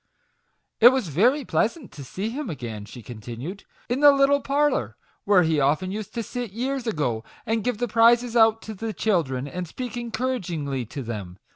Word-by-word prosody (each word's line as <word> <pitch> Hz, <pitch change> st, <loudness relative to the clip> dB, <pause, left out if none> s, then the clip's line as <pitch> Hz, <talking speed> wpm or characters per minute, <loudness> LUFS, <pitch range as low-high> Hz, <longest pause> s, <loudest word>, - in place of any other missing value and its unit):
"It 235 Hz, -, +10 dB
was 255 Hz, -8 st, -1 dB
very 245 Hz, -, +2 dB
pleasant 235 Hz, +3 st, -1 dB
to 145 Hz, -, -9 dB
see 190 Hz, -, -4 dB
him 285 Hz, +1 st, -4 dB
again," 115 Hz, -8 st, -6 dB
she 115 Hz, +3 st, -11 dB
continued, 120 Hz, -, -8 dB, 0.2 s
"in 245 Hz, +2 st, -1 dB
the 290 Hz, 0 st, +8 dB
little 280 Hz, 0 st, +3 dB
parlour 275 Hz, -, 0 dB, 0.3 s
where 200 Hz, -3 st, +5 dB
he 160 Hz, -2 st, +1 dB
often 150 Hz, +7 st, +1 dB
used 210 Hz, +2 st, -6 dB
to 230 Hz, -, -2 dB
sit 240 Hz, -3 st, -5 dB
years 255 Hz, +2 st, -2 dB
ago, 125 Hz, -, -1 dB, 0.2 s
and 225 Hz, -1 st, 0 dB
give 250 Hz, -3 st, -1 dB
the 245 Hz, +2 st, -1 dB
prizes 235 Hz, +2 st, +4 dB
out 225 Hz, -1 st, +4 dB
to 220 Hz, -, -6 dB
the 220 Hz, +2 st, -4 dB
children, 145 Hz, -13 st, 0 dB
and 180 Hz, +4 st, -5 dB
speak 245 Hz, +8 st, -6 dB
encouragingly 185 Hz, -, -3 dB
to 140 Hz, +4 st, -6 dB
them. 100 Hz, -6 st, -6 dB
210 Hz, 180 wpm, -24 LUFS, -, 0.3 s, It